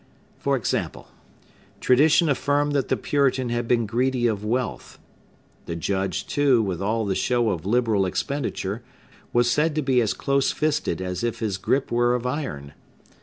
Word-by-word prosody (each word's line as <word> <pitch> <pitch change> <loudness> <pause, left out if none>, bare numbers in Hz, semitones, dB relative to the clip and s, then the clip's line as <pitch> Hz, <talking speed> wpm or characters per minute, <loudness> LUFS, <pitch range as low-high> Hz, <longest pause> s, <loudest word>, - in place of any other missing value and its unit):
For 140 0 +1
example: 115 - -3 0.7
tradition 150 +6 +4
affirmed 145 +1 +1
that 140 -3 0
the - - 0
Puritan 135 -3 +1
had 120 0 -2
been 115 -1 +2
greedy 125 +3 0
of 105 -3 0
wealth; 120 +4 -3 0.7
the 85 - -3
Judge, 95 +1 -2
too, 140 -4 +3
with 95 -4 -3
all 110 +2 0
the 100 - 0
show 120 +2 +1
of 90 -1 -4
liberal 110 -4 +2
expenditure, 120 -3 -3 0.5
was 120 0 +3
said 150 +2 +1
to 155 - 0
be 130 -2 +3
as 110 - 0
close 140 0 +1
fisted 150 - -1
as 90 +4 -4
if 115 -1 -1
his 105 -4 -2
gripe 135 +7 0
were 120 +1 +2
of 125 0 -4
iron. 125 - -4
120 Hz, 165 wpm, -24 LUFS, 100-140 Hz, 0.7 s, tradition